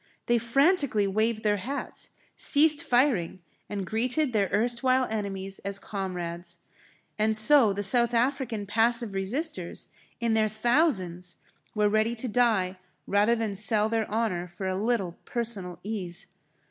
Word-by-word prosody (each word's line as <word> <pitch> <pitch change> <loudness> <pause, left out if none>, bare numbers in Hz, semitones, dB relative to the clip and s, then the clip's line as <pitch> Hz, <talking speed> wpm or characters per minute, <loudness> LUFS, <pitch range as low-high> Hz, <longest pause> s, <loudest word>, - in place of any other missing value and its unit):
They 240 0 +2
frantically 275 - +2
waved 215 +3 0
their 210 -1 +2
hats, 265 +9 -5 0.3
ceased 295 0 +4
firing, 240 - +1 0.3
and 200 -2 -4
greeted 245 +6 -1
their 200 -3 +1
erstwhile 245 +3 +1
enemies 195 -2 -4
as 200 0 -4
comrades. 175 -4 -6 0.6
And 215 0 +2
so 230 0 +6
the 200 +1 -3
South 235 +3 +5
African 240 -3 -1
passive 230 +1 +1
resisters 195 - -3 0.3
in 230 -1 0
their 220 -1 +2
thousands 205 - 0 0.4
were 210 -1 +2
ready 215 +3 +1
to 240 +2 -3
die 210 -6 +1 0.3
rather 205 +4 +2
than 225 -3 -2
sell 215 +1 +3
their 225 -1 -1
honour 205 -5 -1
for 175 +2 -8
a 190 - -1
little 195 -3 -2
personal 210 -7 -4
ease. 195 -2 -5
215 Hz, 135 wpm, -27 LUFS, 195-240 Hz, 0.6 s, so